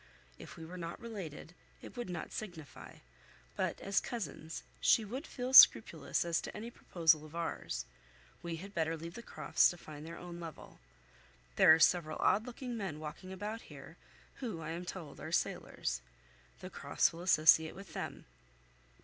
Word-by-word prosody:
If -, -, -11 dB
we 165 Hz, -, -8 dB
were 180 Hz, +3 st, -8 dB
not 170 Hz, 0 st, -6 dB
related, 190 Hz, -9 st, -7 dB, 0.3 s
it -, -, -11 dB
would 240 Hz, -5 st, -5 dB
not 175 Hz, -, -5 dB
signify; 165 Hz, -10 st, -8 dB, 0.6 s
but -, -, -1 dB
as 195 Hz, 0 st, +2 dB
cousins, 195 Hz, -8 st, -6 dB, 0.2 s
she 225 Hz, -, +4 dB
would 260 Hz, +9 st, -6 dB
feel 255 Hz, 0 st, -4 dB
scrupulous 265 Hz, -, +7 dB
as 170 Hz, -1 st, +1 dB
to -, -, -7 dB
any 230 Hz, +3 st, -6 dB
proposal 160 Hz, -8 st, +2 dB
of 155 Hz, +1 st, -12 dB
ours. 60 Hz, -, -3 dB, 0.6 s
We 170 Hz, -1 st, -4 dB
had 195 Hz, +5 st, -9 dB
better 165 Hz, -1 st, 0 dB
leave 165 Hz, +2 st, -8 dB
the 235 Hz, -, -8 dB
Crofts -, -, +2 dB
to 175 Hz, -, -6 dB
find 150 Hz, -3 st, -10 dB
their 165 Hz, +1 st, -8 dB
own 175 Hz, -1 st, -8 dB
level. 165 Hz, -3 st, -10 dB, 0.8 s
There -, -, +7 dB
are -, -, -1 dB
several 160 Hz, -1 st, +3 dB
odd 215 Hz, +4 st, +2 dB
looking 250 Hz, 0 st, -5 dB
men 190 Hz, -9 st, -4 dB
walking 155 Hz, +5 st, -8 dB
about 210 Hz, +4 st, -5 dB
here, -, -, -11 dB, 0.4 s
who, 225 Hz, -10 st, -4 dB
I 160 Hz, 0 st, -5 dB
am 175 Hz, +2 st, -5 dB
told, 170 Hz, -6 st, -7 dB
are 155 Hz, -, -7 dB
sailors. 60 Hz, -, -1 dB, 0.6 s
The -, -, -8 dB
Crofts 170 Hz, -, +1 dB
will 165 Hz, -, -8 dB
associate 160 Hz, -2 st, +5 dB
with 195 Hz, 0 st, -11 dB
them." -, -, -5 dB
170 Hz, 170 wpm, -34 LUFS, 160-205 Hz, 0.8 s, scrupulous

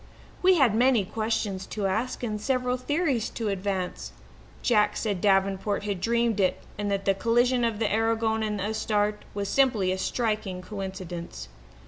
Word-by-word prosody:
We 370 Hz, 0 st, +6 dB
had 265 Hz, -, +4 dB
many 240 Hz, -2 st, +3 dB
questions 215 Hz, -2 st, -2 dB
to 210 Hz, -2 st, -3 dB
ask 220 Hz, +7 st, -1 dB
and 210 Hz, -3 st, -2 dB
several 250 Hz, +1 st, 0 dB
theories 275 Hz, -2 st, 0 dB
to 225 Hz, -3 st, -3 dB
advance. 190 Hz, -2 st, -3 dB, 0.5 s
Jack 210 Hz, -3 st, +3 dB
said 200 Hz, -5 st, -2 dB
Davenport 195 Hz, +1 st, +1 dB
had 200 Hz, -3 st, -3 dB
dreamed 235 Hz, -1 st, +1 dB
it 185 Hz, -2 st, +2 dB, 0.2 s
and 205 Hz, +1 st, -2 dB
that 195 Hz, -1 st, -1 dB
the 195 Hz, -, +4 dB
collision 240 Hz, +4 st, +2 dB
of 230 Hz, -2 st, 0 dB
the 220 Hz, -1 st, 0 dB
Aragon 225 Hz, 0 st, +1 dB
and 210 Hz, -1 st, -1 dB
the -, -, -2 dB
Astarte 210 Hz, -1 st, 0 dB
was 200 Hz, -1 st, -2 dB
simply 230 Hz, -9 st, +2 dB
a 190 Hz, -, -2 dB
striking 210 Hz, -5 st, -2 dB
coincidence. 185 Hz, -, -6 dB
210 Hz, 160 wpm, -27 LUFS, 195-235 Hz, 0.5 s, We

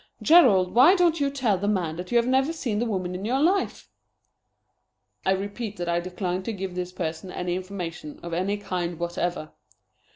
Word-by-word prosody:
Gerald, 210 Hz, -, +6 dB
why 270 Hz, -, +7 dB
don't 345 Hz, -3 st, +3 dB
you 280 Hz, -1 st, +1 dB
tell 245 Hz, -9 st, 0 dB
the 200 Hz, -, -2 dB
man 180 Hz, -6 st, 0 dB
that 180 Hz, +1 st, -6 dB
you 240 Hz, -, +4 dB
have 235 Hz, -, +3 dB
never 265 Hz, +4 st, +2 dB
seen 245 Hz, -10 st, -2 dB
the 240 Hz, -, 0 dB
woman 185 Hz, -4 st, -2 dB
in 180 Hz, +2 st, -5 dB
your 250 Hz, +5 st, 0 dB
life?" 365 Hz, +7 st, +1 dB, 1.4 s
"I -, -, +4 dB
repeat 205 Hz, +2 st, -4 dB
that 175 Hz, -, -4 dB
I 170 Hz, 0 st, +1 dB
decline 180 Hz, +1 st, -3 dB
to 225 Hz, +4 st, -4 dB
give 190 Hz, -2 st, -5 dB
this 180 Hz, 0 st, -4 dB
person 170 Hz, 0 st, -5 dB
any 180 Hz, -1 st, -3 dB
information 180 Hz, -5 st, -6 dB
of 170 Hz, -1 st, -6 dB
any 190 Hz, +4 st, 0 dB
kind 180 Hz, -4 st, -3 dB
whatever." 175 Hz, -1 st, -3 dB
190 Hz, 190 wpm, -25 LUFS, 180-240 Hz, 1.4 s, why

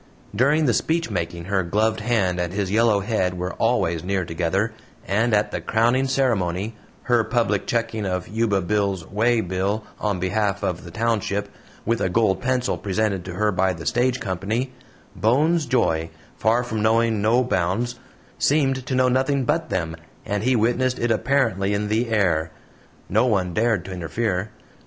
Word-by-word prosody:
During 145 Hz, +8 st, +3 dB
the 125 Hz, -, +3 dB
speechmaking 90 Hz, -, -1 dB
her 95 Hz, 0 st, +1 dB
gloved 105 Hz, +5 st, 0 dB
hand 105 Hz, -6 st, 0 dB
and 85 Hz, -1 st, -1 dB
his 95 Hz, -1 st, -2 dB
yellow 110 Hz, -1 st, +3 dB
head 95 Hz, -4 st, -1 dB
were 90 Hz, +1 st, -3 dB
always 85 Hz, -9 st, 0 dB
near 95 Hz, -1 st, -1 dB
together, 90 Hz, +7 st, -1 dB, 0.3 s
and 110 Hz, +5 st, +1 dB
at 105 Hz, -1 st, +2 dB
the -, -, -3 dB
crowning 120 Hz, +4 st, +2 dB
ceremony 110 Hz, -6 st, 0 dB, 0.3 s
her 120 Hz, -2 st, +3 dB
public 115 Hz, -4 st, 0 dB
checking 115 Hz, -2 st, -1 dB
of 90 Hz, -2 st, -2 dB
Yuba 105 Hz, -3 st, 0 dB
Bill's 100 Hz, -2 st, -1 dB
"waybill" 105 Hz, -2 st, 0 dB, 0.2 s
on 100 Hz, -4 st, -1 dB
behalf 100 Hz, +2 st, 0 dB
of 90 Hz, -1 st, -2 dB
the -, -, -8 dB
township, 105 Hz, 0 st, -1 dB, 0.4 s
with 115 Hz, +1 st, 0 dB
a -, -, +1 dB
gold 95 Hz, -1 st, +2 dB
pencil 125 Hz, -1 st, 0 dB
presented 100 Hz, -1 st, -1 dB
to 90 Hz, -, -6 dB
her 105 Hz, +4 st, +1 dB
by 95 Hz, -1 st, +1 dB
the 80 Hz, -2 st, -9 dB
Stage 125 Hz, -, +1 dB
Company 110 Hz, +7 st, -2 dB, 0.4 s
Bones' 150 Hz, +8 st, +2 dB
joy, 80 Hz, -10 st, +1 dB, 0.3 s
far 115 Hz, +3 st, +2 dB
from 110 Hz, -3 st, -3 dB
knowing 110 Hz, 0 st, +2 dB
no 115 Hz, +4 st, +3 dB
bounds, 120 Hz, +3 st, -1 dB, 0.4 s
seemed 135 Hz, +1 st, +1 dB
to 130 Hz, -, -1 dB
know 130 Hz, 0 st, +4 dB
nothing 130 Hz, +1 st, +1 dB
but 165 Hz, +4 st, 0 dB
them, 80 Hz, -3 st, -2 dB, 0.3 s
and 105 Hz, -1 st, -1 dB
he 130 Hz, +3 st, +2 dB
witnessed 120 Hz, +3 st, +1 dB
it 120 Hz, 0 st, 0 dB
apparently 110 Hz, -5 st, +1 dB
in 105 Hz, 0 st, -2 dB
the 115 Hz, +2 st, 0 dB
air. 85 Hz, -7 st, +1 dB, 0.6 s
No 110 Hz, +6 st, +2 dB
one 95 Hz, -6 st, +1 dB
dared 110 Hz, -2 st, +1 dB
to 95 Hz, -, -7 dB
interfere. 95 Hz, +3 st, -2 dB
110 Hz, 165 wpm, -23 LUFS, 95-120 Hz, 0.6 s, know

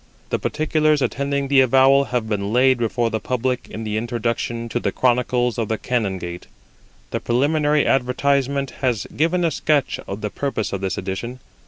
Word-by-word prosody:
The -, -, 0 dB
particulars 155 Hz, -1 st, +1 dB
attending 140 Hz, 0 st, -1 dB
the 135 Hz, -1 st, +5 dB
avowal 135 Hz, +2 st, +5 dB
have 125 Hz, -4 st, -2 dB
been 100 Hz, -1 st, -2 dB
laid 130 Hz, +1 st, +4 dB
before 115 Hz, 0 st, 0 dB
the 110 Hz, -, -1 dB
public 125 Hz, +1 st, -2 dB
in 110 Hz, -, -6 dB
the 105 Hz, -1 st, -2 dB
Introduction 115 Hz, 0 st, -2 dB
to 120 Hz, -, -1 dB
the -, -, -1 dB
Chronicles 125 Hz, -1 st, +1 dB
of 115 Hz, -, -1 dB
the 110 Hz, -, -1 dB
Canongate. 95 Hz, -9 st, -3 dB, 0.6 s
The -, -, -1 dB
preliminary 145 Hz, +4 st, +2 dB
advertisement 135 Hz, +1 st, +1 dB
has 125 Hz, -7 st, 0 dB
given 170 Hz, +3 st, +1 dB
a 165 Hz, -, +1 dB
sketch 150 Hz, -1 st, 0 dB
of 100 Hz, +2 st, -5 dB
the 105 Hz, -, -3 dB
purpose 135 Hz, -8 st, -3 dB
of 100 Hz, -, -3 dB
this 95 Hz, -1 st, -2 dB
edition. 100 Hz, +7 st, -4 dB
125 Hz, 170 wpm, -21 LUFS, 110-140 Hz, 0.6 s, the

